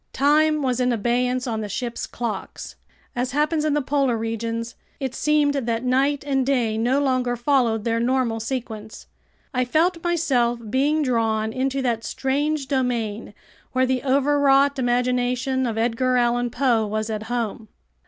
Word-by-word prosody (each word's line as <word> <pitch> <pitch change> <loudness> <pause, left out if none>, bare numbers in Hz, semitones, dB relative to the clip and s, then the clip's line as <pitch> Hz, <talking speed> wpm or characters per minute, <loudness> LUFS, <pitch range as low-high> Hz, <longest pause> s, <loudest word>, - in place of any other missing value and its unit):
Time 300 +2 +3
was 255 -2 0
in 250 0 +2
abeyance 245 +2 0
on 225 -3 -2
the 210 - -5
ship's 240 +3 -4
clocks. 235 -3 -5 0.4
As 250 +1 -2
happens 300 +2 +1
in 305 -1 +1
the 295 - 0
polar 270 -3 +1
regions, 230 +1 -3 0.3
it 265 -3 -3
seemed 300 0 +2
that 235 -4 -1
night 270 +3 +1
and 270 -2 +1
day 250 -5 +1
no 245 +5 +1
longer 255 -3 +1
followed 240 -4 +1
their 230 0 0
normal 240 -2 0
sequence. 220 -3 -6 0.5
I 255 -1 +1
felt 330 +6 +1
myself 265 -9 +1
being 295 +4 +2
drawn 220 -4 0
into 270 +1 -1
that 230 -3 -1
strange 285 +3 -1
domain 235 -6 -2 0.4
where 260 0 +3
the 255 -1 0
overwrought 280 0 +3
imagination 250 +1 0
of 225 -1 -3
Edgar 245 +2 +1
Allan 240 0 +1
Poe 235 -3 +1
was 215 +1 -2
at 215 -1 -3
home. 230 -2 -3
250 Hz, 155 wpm, -23 LUFS, 230-275 Hz, 0.5 s, Time